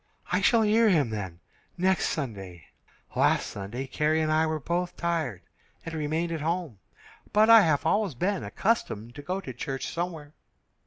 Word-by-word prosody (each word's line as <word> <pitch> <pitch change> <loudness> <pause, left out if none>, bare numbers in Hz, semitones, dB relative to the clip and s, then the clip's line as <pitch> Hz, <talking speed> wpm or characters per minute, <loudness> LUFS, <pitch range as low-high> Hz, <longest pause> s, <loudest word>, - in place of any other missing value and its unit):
"I - - +2
shall 230 -2 +4
hear 220 +1 +4
him, 150 - +2
then, 95 -5 -5 0.4
next 185 +1 +2
Sunday. 95 - -5 0.5
Last - - +3
Sunday 105 +7 -5
Carrie 150 +3 +1
and 155 0 0
I 160 +1 +3
were 155 0 -1
both 175 +5 -2
tired, 160 - -2 0.4
and 165 - -6
remained 160 +2 -1
at 160 -2 -3
home, 165 - -2 0.5
but 215 +2 +5
I 225 -1 +10
have 155 -6 +1
always 205 -9 +1
been 190 +9 -1
accustomed 120 - -1
to 145 - -9
go 185 +6 -3
to 130 -9 -7
church 135 +2 -4
somewhere." 165 -4 -5
155 Hz, 165 wpm, -27 LUFS, 130-180 Hz, 0.5 s, I